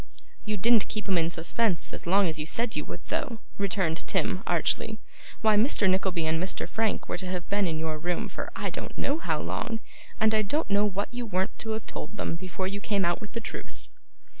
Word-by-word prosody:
'You 210 -1 -1
didn't 225 +2 +5
keep 215 -1 -3
'em 185 -3 +4
in 165 0 +2
suspense 170 +3 0
as - - -5
long 195 +2 +5
as 155 -2 -2
you 150 - -1
said 230 +5 0
you - - -1
would, - - -7
though,' 235 - -1 0.2
returned 185 -4 0
Tim, 185 - +1
archly. 175 +5 +1 0.4
'Why, 220 -1 +5
Mr. 210 -2 +4
Nickleby 185 -3 +2
and 160 +1 +2
Mr. 185 - -1
Frank 220 -1 0
were - - -2
to 185 - -4
have 180 -2 -3
been 200 -1 +3
in 160 -2 -1
your 155 -1 -2
room 175 +2 -1
for - - -5
I - - -2
don't - - -5
know 290 +3 +1
how - - 0
long; 225 -1 -2 0.4
and 220 0 +4
I 215 - +5
don't 290 +6 -1
know 205 +1 +5
what 200 +3 -1
you 245 -1 -3
weren't 190 -1 0
to 220 -1 -2
have 220 0 -4
told 210 - -6
them - - -1
before 185 +2 -3
you 200 +1 -3
came 200 -3 +1
out 175 0 +1
with 215 - -8
the 230 - -1
truth. 230 - -7
200 Hz, 225 wpm, -28 LUFS, 175-220 Hz, 0.4 s, didn't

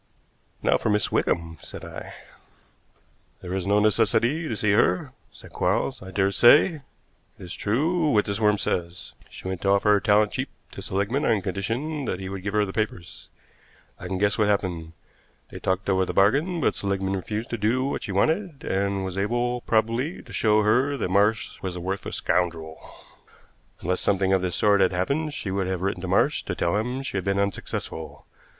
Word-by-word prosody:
"Now - - +3
for - - -1
Miss 105 -2 +1
Wickham," 80 -2 -1
said - - -9
I. - - -9 1.3
"There 90 0 -5
is 95 -1 -2
no 100 +1 +3
necessity 115 - +2
to 115 - -2
see 105 -1 +1
her," 90 -3 +2 0.2
said - - -15
Quarles. - - 0
"I 95 - -9
dare 95 +1 +1
say 145 - +6
it - - -16 0.6
is 90 - -7
true 155 - +1
what 105 -6 +3
this 100 +1 -2
worm 105 -1 +3
says. 85 -2 -3 0.2
She - - -9
went 95 -2 -4
to 100 - 0
offer 100 +1 +3
her 105 - +5
talent 105 +1 +3
cheap - - -3 0.2
to - - -8
Seligmann 100 +9 -1
on 105 -4 +2
condition 120 - -3
that 90 - -2
he 95 -1 -5
would 95 -1 -5
give 100 +2 -3
her 105 -1 +3
the 95 - -7
papers. 95 -3 -4 0.7
I 90 - -7
can 95 0 -2
guess 100 +3 +1
what 105 - +3
happened. 90 -5 -1 0.6
They - - -8
talked 95 +1 -1
over 95 -1 +2
the - - -3
bargain, 145 - +3
but - - +2
Seligmann 95 -1 -1
refused 105 +4 -4
to 120 - -1
do 120 +5 +1
what 140 - -2
she 105 - -5
wanted, 160 - 0
and 100 0 -1
was 95 0 -4
able, 120 +4 0
probably, 115 +8 0
to - - -13
show 105 -1 +3
her 130 +7 +2
that 100 -7 -2
Marsh 105 +3 +1
was 95 -2 -4
a - - -5
worthless 95 +2 -4
scoundrel. 80 -3 -1 1.0
Unless 90 +2 -1
something 95 -1 +2
of 95 - +3
this 90 -2 -1
sort 100 -1 +3
had 95 0 +3
happened 145 - -1
she 100 - -4
would 95 -1 -1
have 95 -1 -2
written 95 -2 -1
to 95 - -4
Marsh 95 - +2
to - - -3
tell 85 - 0
him 125 +5 -2
she 115 - -3
had 95 - -2
been 100 +1 0
unsuccessful. 80 -6 -4
100 Hz, 195 wpm, -25 LUFS, 95-115 Hz, 1.3 s, say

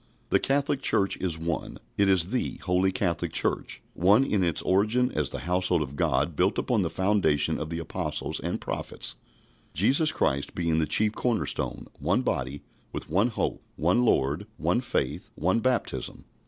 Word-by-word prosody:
The - - +4
Catholic 140 0 0
Church 100 -6 +3
is 85 -4 0
One. 85 +1 -3 0.2
It 100 -1 +3
is 90 -2 +3
the 125 +3 -1
Holy 90 +1 +2
Catholic 90 -4 -1
Church, - - -1
one 100 +8 +4
in 105 -8 +1
its 85 -2 +1
origin 110 +7 +2
as 75 -4 0
the - - -5
household 90 -1 +1
of 70 0 -8
God 70 +3 +1
built - - +2
upon - - +1
the - - 0
foundation 95 -7 +2
of 80 - -4
the 85 - -3
Apostles 85 - -3
and - - -3
Prophets, - - -3 0.6
Jesus 135 - +3
Christ 70 - -1
being 85 -2 +1
the 80 - +1
chief 105 +8 +3
corner 120 -1 0
stone; - - -2
one - - +1
body, 70 +2 -2 0.3
with - - -6
one 100 +7 +3
hope, 120 - -2
one 90 +10 +2
Lord, 75 - +1
one 120 - +1
faith, 70 - -2
one 95 +8 +1
baptism. 125 0 -2
95 Hz, 170 wpm, -27 LUFS, 80-110 Hz, 0.6 s, The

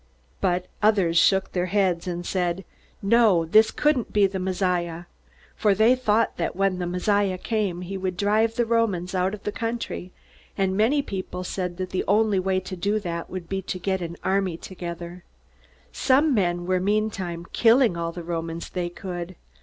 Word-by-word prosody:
But 180 -1 0 0.2
others 200 -6 +3
shook 195 +1 +3
their 180 0 -1
heads 185 -3 +1
and 175 0 -4
said, 180 0 -1 0.4
"No 205 -5 +4
this 215 +7 +5
couldn't 295 -6 +1
be 205 -1 +4
the 190 0 -2
Messiah!" 180 -2 -1 0.5
For 210 -2 +2
they 220 +5 +5
thought 230 -3 +1
that 170 - -2
when 195 -1 +1
the 175 - -2
Messiah 190 +1 +1
came 200 -4 -2
he 190 +2 -5
would 185 -1 -3
drive 215 +3 +2
the 240 - +1
Romans 215 -6 0
out 185 +2 0
of 205 - -16
the 210 - -2
country; 225 -5 -4 0.5
and 190 -1 +1
many 250 +8 +3
people 185 -3 -5
said 180 -1 -4
that 185 -1 -4
the 185 - -1
only 210 -1 +3
way 185 0 +1
to 185 0 -7
do 200 +4 0
that 170 -4 -5
would 185 -3 -6
be 195 +1 -2
to 185 0 -4
get 190 +1 -1
an 170 0 -5
army 190 -3 0
together. 175 -1 -7 0.7
Some 280 +3 +3
men 175 -5 0
were 185 0 +1
meantime 190 -4 -1
killing 235 -3 +4
all 170 0 -2
the 175 0 -7
Romans 165 0 -4
they 175 -1 -2
could. 175 0 -6
190 Hz, 175 wpm, -25 LUFS, 175-210 Hz, 0.7 s, this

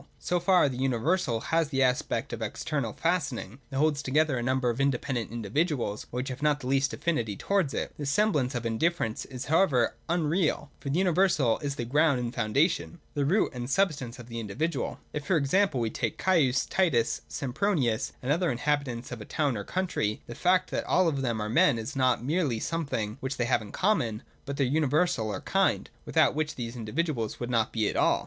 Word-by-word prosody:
So 180 - -1
far 180 -2 +4
the 130 -3 -4
universal 135 +1 +1
has 165 -2 +3
the 135 -2 +2
aspect 125 -1 0
of - - -5
an - - 0
external 140 -8 -3
fastening, 145 - -2
that 135 - -4
holds 145 0 +2
together 150 +1 +2
a 120 - -1
number 130 0 +1
of 120 +4 -3
independent 130 -3 0
individuals, 120 - -1
which 125 +2 -3
have 130 +2 -6
not 150 -1 +2
the 135 - -9
least 135 +1 +2
affinity 145 - -1
towards 190 - 0
it. - - -2
This 145 -2 -2
semblance 145 -7 +2
of 120 -1 -3
indifference 115 +1 0
is 130 0 -7
how 160 +5 +4
ever 125 -11 +2
unreal: 160 -3 0
for 140 - -5
the 145 - 0
universal 180 -9 +3
is 140 -1 -3
the 120 - -3
ground 145 +2 +3
and 120 -1 -3
foundation, 140 - 0
the 145 -1 0
root 190 +9 +2
and 125 0 -5
substance 145 -9 0
of 120 -2 -11
the 115 -1 -5
individual. 135 +8 -2
If 150 -1 -5
e.g. 185 +3 +3
we 115 -3 0
take - - -2
Caius, 145 -9 +2
Titus, 145 -12 +1
Sempronius, 130 - 0
and 130 - 0
the - - +6
other 175 +2 +1
inhabitants 130 -2 -1
of 120 -3 -6
a - - -7
town 145 -5 0
or 100 - -4
country, 140 - -2
the 120 - -8
fact 185 +6 +2
that - - -1
all 185 -1 +3
of 140 -4 0
them 120 -4 -1
are 105 - -2
men 120 +3 +4
is 110 +3 -5
not 130 -3 +2
merely 145 -5 0
something 130 -9 -2
which 135 0 -4
they 120 - +1
have 115 - +2
in 105 - -9
common, 140 - 0 0.2
but 140 0 -4
their 140 - +2
universal 145 -2 +1
or 105 - -4
kind, - - +1
without - - +3
which 155 0 -2
these 120 -1 -5
individuals 120 0 -2
would 120 0 -4
not 115 -2 +1
be 110 -2 0
at - - -2
all. - - +3
135 Hz, 205 wpm, -28 LUFS, 120-160 Hz, 0.2 s, the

